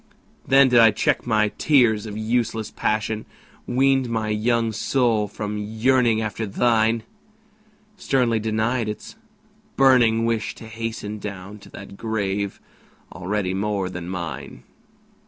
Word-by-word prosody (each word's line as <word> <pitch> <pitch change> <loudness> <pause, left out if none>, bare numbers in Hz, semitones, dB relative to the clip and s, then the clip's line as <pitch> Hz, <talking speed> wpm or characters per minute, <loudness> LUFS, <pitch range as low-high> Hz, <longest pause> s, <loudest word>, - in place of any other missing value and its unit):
Then 135 0 +6
did 120 -1 +5
I 115 -1 +8
check 105 - 0
my 110 -2 +2
tears 115 -8 +3
of 105 0 -6
useless 110 -1 -1
passion, 110 0 -2 0.4
Weaned 135 0 +2
my 110 -2 -2
young 115 +2 +1
soul 115 -2 +1
from 105 0 -5
yearning 110 +2 +1
after 110 +1 -3
thine, 115 +1 +1 0.9
Sternly 125 -9 +1
denied 110 +2 -1
its 105 - -7 0.6
burning 120 -4 +4
wish 115 -1 -1
to - - -11
hasten 110 -1 -5
Down 100 0 -8
to - - -15
that 100 0 -11
grave 100 -3 -2 0.5
already 95 +2 -2
more 100 -1 -1
than 90 -1 -6
mine! 85 -3 -6
110 Hz, 125 wpm, -23 LUFS, 105-115 Hz, 0.9 s, I